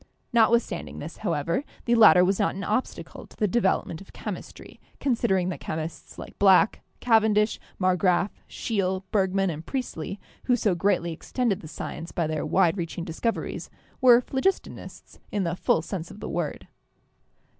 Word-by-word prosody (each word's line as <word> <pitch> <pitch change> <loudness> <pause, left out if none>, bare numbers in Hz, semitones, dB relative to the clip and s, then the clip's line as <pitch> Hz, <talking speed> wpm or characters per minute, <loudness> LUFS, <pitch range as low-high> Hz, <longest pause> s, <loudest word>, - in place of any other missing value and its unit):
Notwithstanding 230 -5 +2
this, 155 +3 -7
however, 170 - -1 0.2
the 235 - +2
latter 215 -6 +7
was 190 +1 +1
not - - +1
an 195 - -5
obstacle 220 +6 -3
to - - -19
the 210 - +2
development 190 -5 0
of 195 - -15
chemistry, - - -8 0.2
considering 225 -9 +1
that 180 - -5
chemists 160 +1 -6
like - - -10
Black, 200 +2 +5 0.2
Cavendish, 220 -2 +3 0.2
Marg 185 -1 +2
graf, 185 +2 +2 0.2
Scheele, 190 -4 -1
Bergman, 195 -2 +1
and 155 0 -7
Priestley, 200 - -4 0.3
who 250 - +4
so 210 -5 +1
greatly 175 -1 +1
extended 225 +4 -1
the 155 - -10
science 165 +1 -7
by 170 - -1
their 155 -1 -2
wide 185 0 +2
reaching 170 0 -4
discoveries, 180 +7 -3 0.3
were 245 -1 +7
phlogistonists 275 +11 -3
in 205 -2 0
the 170 0 -1
full 165 - +1
sense 170 -2 -5
of 205 - -11
the - - -6
word. - - -3
195 Hz, 155 wpm, -26 LUFS, 170-220 Hz, 0.3 s, latter